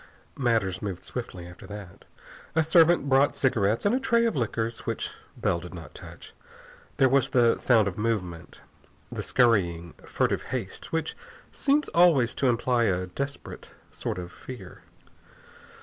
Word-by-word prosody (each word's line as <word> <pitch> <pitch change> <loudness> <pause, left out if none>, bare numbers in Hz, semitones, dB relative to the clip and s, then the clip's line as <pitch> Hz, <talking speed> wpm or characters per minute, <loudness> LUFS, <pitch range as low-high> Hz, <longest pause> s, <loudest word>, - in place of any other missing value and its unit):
Matters 110 -7 +1
moved 95 -4 -5
swiftly 95 -8 -6
after 90 0 -12
that. 100 -3 -10 0.5
A 160 - +4
servant 165 -1 +4
brought 135 +1 +4
cigarettes 110 - +1
and 205 - +3
a 255 - +2
tray 235 -3 +2
of 230 - 0
liquors 115 -2 -2
which - - -4 0.3
Bell 85 - 0
did 90 +2 -9
not 80 -3 -10
touch. - - -12 0.6
There 135 - +5
was 135 0 +2
the 120 -4 +3
sound 115 -5 +4
of 95 +1 -4
movement, 95 -7 -3 0.5
the - - -4
scurrying, 85 -9 +2
furtive - - 0
haste - - -5
which 160 -1 -2 0.4
seems 290 +1 +1
always 160 -9 +4
to 135 - +1
imply 120 0 +2
a 95 -2 0
desperate 140 +10 -6 0.2
sort - - -4
of 90 -1 -6
fear. 115 -8 -10
115 Hz, 150 wpm, -27 LUFS, 95-140 Hz, 0.6 s, There